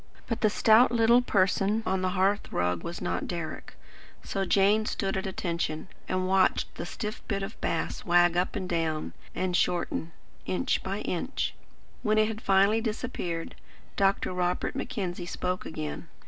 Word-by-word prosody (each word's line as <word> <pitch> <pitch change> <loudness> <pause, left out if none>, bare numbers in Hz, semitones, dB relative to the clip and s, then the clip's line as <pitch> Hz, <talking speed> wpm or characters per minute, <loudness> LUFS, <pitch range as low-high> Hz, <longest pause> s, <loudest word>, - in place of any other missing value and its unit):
But 230 - -3
the 215 - +5
stout 220 +4 +5
little 235 +1 +5
person 200 0 +2
on 190 0 0
the 185 - +1
hearth 195 +2 +1
rug 90 -1 0
was 170 - -5
not 175 - -2
Deryck. 170 -2 -5 0.5
So 195 -1 -2
Jane 205 +3 +3
stood 195 -1 -1
at 190 0 -2
attention, 170 -2 -3 0.2
and 185 0 0
watched 190 0 +2
the - - -6
stiff 215 -1 -5
bit 195 -2 -1
of 205 +3 -7
bass 165 - -2
wag 175 0 +4
up 180 +1 0
and 190 -3 -3
down, 165 -3 -1 0.2
and 185 -1 0
shorten, 170 -2 0 0.4
inch 255 +8 0
by 195 +2 -3
inch. 220 +10 -2 0.5
When 215 -2 +2
it 215 0 +5
had 220 0 -5
finally 200 +3 +4
disappeared, 210 -7 -3 0.4
Dr. 195 -1 +2
Robert 180 +4 -1
Mackenzie 190 -10 -3
spoke 180 +1 -3
again. 155 +1 -5
190 Hz, 160 wpm, -28 LUFS, 175-215 Hz, 0.5 s, the